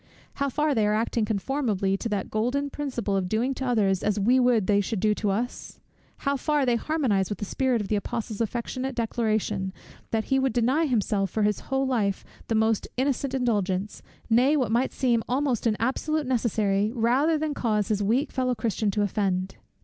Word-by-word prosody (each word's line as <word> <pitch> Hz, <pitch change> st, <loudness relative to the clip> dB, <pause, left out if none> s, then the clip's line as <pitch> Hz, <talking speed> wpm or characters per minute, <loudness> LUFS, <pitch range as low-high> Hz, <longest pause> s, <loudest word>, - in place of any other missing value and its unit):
how 280 Hz, -, +2 dB
far 300 Hz, +3 st, +1 dB
they 220 Hz, -4 st, +2 dB
are 210 Hz, -, +2 dB
acting 225 Hz, 0 st, 0 dB
conformably 210 Hz, -3 st, 0 dB
to 230 Hz, -, -3 dB
that 205 Hz, -3 st, -3 dB
golden 255 Hz, +6 st, 0 dB
principle 250 Hz, -8 st, -2 dB
of 185 Hz, -2 st, -1 dB
doing 235 Hz, +6 st, 0 dB
to 265 Hz, -, -5 dB
others 210 Hz, -7 st, +2 dB
as 210 Hz, 0 st, 0 dB
we 245 Hz, +6 st, +4 dB
would 245 Hz, -5 st, +3 dB
they 205 Hz, 0 st, +3 dB
should 205 Hz, +1 st, -3 dB
do 215 Hz, +2 st, +3 dB
to 210 Hz, 0 st, -1 dB
us? 230 Hz, +6 st, -3 dB, 0.5 s
how 280 Hz, 0 st, +2 dB
far 290 Hz, +1 st, +1 dB
they 245 Hz, -2 st, +2 dB
harmonize 235 Hz, -, 0 dB
with 205 Hz, -, -3 dB
the 205 Hz, -, -4 dB
spirit 255 Hz, +2 st, 0 dB
of 205 Hz, -, -4 dB
the 215 Hz, -, 0 dB
Apostle's 220 Hz, 0 st, -3 dB
affectionate 245 Hz, +3 st, -3 dB
declaration, 215 Hz, -4 st, -1 dB, 0.4 s
that 225 Hz, -1 st, 0 dB
he 270 Hz, +3 st, +1 dB
would 265 Hz, -1 st, +1 dB
deny 260 Hz, +7 st, +2 dB
himself 210 Hz, -5 st, 0 dB
for 215 Hz, +4 st, -1 dB
his 210 Hz, 0 st, +1 dB
whole 270 Hz, 0 st, +1 dB
life 215 Hz, -7 st, 0 dB, 0.2 s
the 225 Hz, -, 0 dB
most 220 Hz, -1 st, +1 dB
innocent 270 Hz, 0 st, 0 dB
indulgence, 205 Hz, -5 st, -1 dB, 0.3 s
nay, 255 Hz, +6 st, +4 dB
what 250 Hz, -6 st, 0 dB
might 240 Hz, +3 st, +1 dB
seem 240 Hz, -4 st, +1 dB
almost 255 Hz, -3 st, 0 dB
an 215 Hz, -2 st, +1 dB
absolute 295 Hz, +6 st, 0 dB
necessary, 215 Hz, -5 st, +1 dB
rather 260 Hz, +8 st, +2 dB
than 305 Hz, -1 st, -2 dB
cause 215 Hz, -6 st, 0 dB
his 210 Hz, -2 st, +1 dB
weak 240 Hz, +8 st, +1 dB
fellow 255 Hz, -1 st, 0 dB
Christian 220 Hz, -1 st, -1 dB
to 205 Hz, +1 st, 0 dB
offend? 190 Hz, -2 st, -1 dB
230 Hz, 195 wpm, -26 LUFS, 210-260 Hz, 0.5 s, we